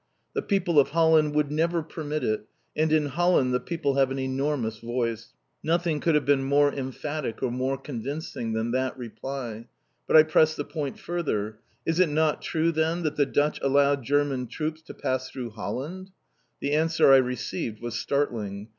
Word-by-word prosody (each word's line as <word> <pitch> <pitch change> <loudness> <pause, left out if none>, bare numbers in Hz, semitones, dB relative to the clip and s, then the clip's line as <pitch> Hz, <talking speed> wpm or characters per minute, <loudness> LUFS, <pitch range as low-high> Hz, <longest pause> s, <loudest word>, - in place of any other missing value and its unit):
The 430 - -1
people 180 - +2
of 140 - +4
Holland 160 -1 +3
would 150 -1 +1
never 165 +2 +1
permit 155 -1 -4
it, 110 0 -1 0.3
and 155 0 +1
in 155 -1 +3
Holland 145 -3 +2
the 125 - +2
people 145 -4 -2
have 135 -1 +4
an 135 - -3
enormous 130 -4 -1
voice. 115 -1 -3 0.3
Nothing 165 -1 0
could 165 0 +2
have 150 - +2
been 140 -1 +3
more 145 +1 +3
emphatic 135 -1 -4
or 125 - +1
more 130 +2 -1
convincing 135 -2 -5
than 110 +1 -1
that 130 +1 -1
reply. 120 -1 -6 0.4
But - - +6
I 155 - +10
pressed 155 0 +3
the 145 - -3
point 145 -4 -4
further. 110 -12 -3 0.3
"Is 165 +1 0
it 185 -3 +5
not 155 0 +1
true, 165 0 +1
then, 165 +2 0
that 155 -1 -1
the 145 -2 +2
Dutch 150 +1 +1
allowed 140 0 +3
German 135 -1 0
troops 155 +4 -4
to - - -11
pass 130 0 -2
through 125 -3 -6
Holland?" 135 - -5 0.5
The 140 - -1
answer 155 -2 +4
I - - +9
received 125 -3 -2
was 120 -1 -5
startling. 115 -6 -2
145 Hz, 180 wpm, -26 LUFS, 125-155 Hz, 0.5 s, I